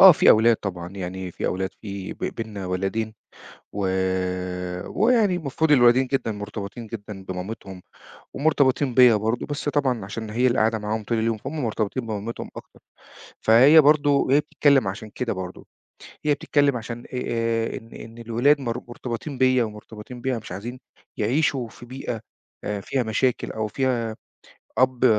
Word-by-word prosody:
آه، 190 -1 +11
في - - +5
أولاد 115 +1 +6
طبعًا. 90 -4 -5
يعني 95 0 -5
في - - -4
أولاد، 95 +1 -1
في 100 -3 -6
ب - - -18
بيننا 105 -4 -5
ولَدين 95 +4 -2 0.6
و 100 -1 -1 1.0
ويعني 220 -4 +3
المفروض 160 -1 0
الولدين 125 -1 +6
جدًا 130 -4 -1
مرتبطين 105 +2 -6
جدًا 105 -3 -8
بمامتهم 95 0 -6 0.5
ومرتبطين 140 -3 +2
بيّا 125 -2 +7
برضه، 110 +3 -1
بس 145 0 -3
طبعًا 130 -8 0
عشان 110 +2 -6
هي 120 +4 +2
اللي 125 - +1
قاعدة 110 0 +2
معاهم 105 +1 -2
طول 115 +2 -1
اليوم، 115 0 0
فهُم 140 +6 -5
مرتبطين 115 +2 -2
بمامتهم 110 +1 -4
أكتر. - - -12 0.6
فهي 130 +8 +7
برضه 145 0 +4
وهي 140 0 +4
بتتكلِّم 140 -6 +3
عشان 105 +3 -6
كده 125 +2 -3
برضه، 95 -1 -7 0.6
هي 150 - +4
بتتكلِّم 145 -2 +2
عشان 115 +1 -7
آآ 115 -2 -1
إن 115 -3 -12
إن 115 +1 -10
الولاد 120 +5 +2
مر 120 -2 -3
مرتبطين 120 +3 -5
بيّا 130 -1 +4
ومرتبطين 110 +2 -9
بيها، 130 -1 0
مش 105 - -11
عايزين 115 +7 -6 0.4
يعيشوا 130 +2 +1
في 120 - -13
بيئة 125 -2 -5 0.4
آآ 105 -1 -3
فيها 130 +5 -1
مشاكل 120 +3 0
أو 110 -1 -2
فيها 120 -2 -1 0.6
أب 130 -1 +3
115 Hz, 155 wpm, -24 LUFS, 105-130 Hz, 1.0 s, آه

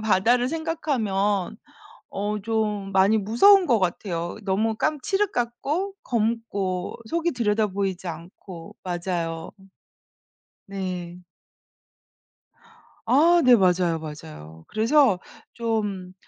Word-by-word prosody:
바다를 230 +4 +3
생각하면 225 - -1 0.5
어 210 +1 -3
좀 210 -2 -2
많이 195 +3 +4
무서운 300 - +5
것 235 -4 +3
같아요. 175 -2 -2
너무 210 +3 0
깜 305 +5 -1
칠흑 395 +5 0
같고 280 +11 -2
검고 215 -6 -2
속이 335 +1 0
들여다보이지 205 - -1
않고 170 +1 -9
맞아요. 170 -2 -3
음. 195 0 -19 1.0
네. 180 -3 -5 1.9
아 325 +8 +5
네. 250 -2 +7
맞아요, 180 -4 +2
맞아요. 80 - -10
그래서 225 -2 +3 0.3
좀 210 -6 -3
205 Hz, 200 characters per minute, -24 LUFS, 185-240 Hz, 1.9 s, 네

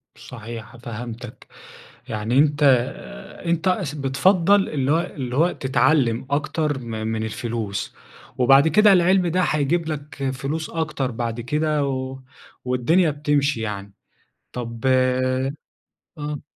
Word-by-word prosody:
صحيح. 115 0 -9
فهمتك، 120 +1 -8 0.6
يعني 110 +4 -1
أنت 145 0 +3
آآ، 125 - 0
أنت 170 +1 0
س 150 -3 -4
بتفضّل 185 +8 +3
اللي 140 -2 -1
هو 165 - +3
اللي 130 -6 -5
هو 170 +4 +3
تتعلم 130 -2 +1
أكتر 150 0 -1
م 125 - -9
من 110 0 -3
الفلوس، 110 -2 -4 0.4
وبعد 135 +4 +6
كده 210 +2 +6
العلم 185 0 +4
ده 180 +2 +1
هيجيب 160 +1 +1
لك 145 -3 -4
فلوس 145 +4 -4
أكتر 150 -5 -2
بعد 115 0 -3
كده، 150 +2 0
و 130 0 -4 0.5
والدنيا 140 +7 +2
بتمشي 145 -3 0
يعني. 100 -2 -5 0.6
طب 115 -2 -6
آه. 130 +1 +2 0.7
امم. 150 -1 -5
135 Hz, 125 wpm, -22 LUFS, 120-155 Hz, 0.7 s, وبعد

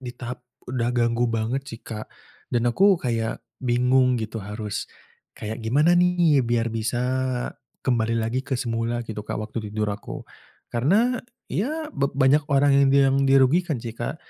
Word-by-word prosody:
di 125 -2 -7
tahap 125 0 -6 0.3
udah 120 -2 0
ganggu 120 0 +2
banget 115 +4 -1
sih, 115 - -8
Kak, 110 -1 -7 0.4
dan 120 0 +2
aku 195 +5 +5
kayak 115 -3 -2 0.2
bingung 125 +1 +3
gitu 110 0 -4
harus 105 0 -5 0.5
kayak 110 +2 -5
gimana 150 +9 +3
nih 175 -5 +4
biar 115 -1 +1
bisa 115 +1 -1 0.9
kembali 115 -2 +1
lagi 115 +3 -1
ke 135 -1 -2
semula 115 -1 -1
gitu, 105 -2 -5
Kak, - - -4
waktu 110 0 -5
tidur 105 0 -1
aku. 100 - -8 0.5
Karena 205 - +2 0.3
ya 305 - -2
ba 140 - +1
banyak 140 +2 +3
orang 140 +1 +4
yang 140 -1 +5
bilang 135 -1 +4
dirugikan 135 +4 +4
sih, 115 -2 -5
Kak, 120 - -3
120 Hz, 155 wpm, -24 LUFS, 115-140 Hz, 0.9 s, aku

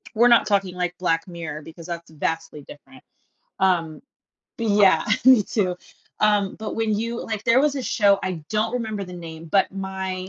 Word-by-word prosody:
we're 235 +3 +5
not 235 -1 +5
talking, 195 -3 +1
like, 180 -1 -2
Black 165 -1 0
Mirror. 165 -3 -6
because 165 +2 -12
that's 170 -1 -6
vastly 160 -1 -4
different, 135 -2 -15 0.6
um 170 -5 +1 0.6
Yeah, 205 -7 +4 0.2
me 255 -5 +7
too 185 -4 -1 0.4
um, 205 -2 +2
but 220 - -5
when 225 -1 0
you 230 +2 -3
like, 220 -1 -5
there 255 +2 +4
was 295 -1 +2
a 270 - -3
show, 200 -4 +3
I 180 -4 -4
don't 215 +1 0
remember 220 -4 -3
the 180 - -11
name, 165 -2 -9
but 195 - +3
my 190 -1 -5
190 Hz, 175 wpm, -23 LUFS, 170-215 Hz, 0.6 s, me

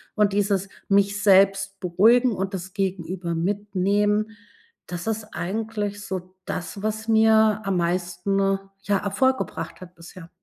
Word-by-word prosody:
und 210 -2 +2
dieses 200 -1 +1 0.2
mich 200 +1 +2
selbst 195 0 +4
beruhigen 225 +8 +4
und 195 0 -3
das 185 0 -7
Gegenüber 185 -3 -3
mitnehmen, 205 +3 0 0.6
das 175 0 -6
ist 220 -1 -2
eigentlich 205 +1 -3
so 185 -1 -6
das, 195 +3 -5
was 215 +1 -3
mir 220 -1 +4
am 195 -2 0
meisten, 175 +2 -1 0.4
ja, 205 -1 +1
Erfolg 260 +7 +1
gebracht - - -5
hat 180 -1 -11
bisher. 170 0 -12
200 Hz, 130 wpm, -24 LUFS, 185-210 Hz, 0.6 s, selbst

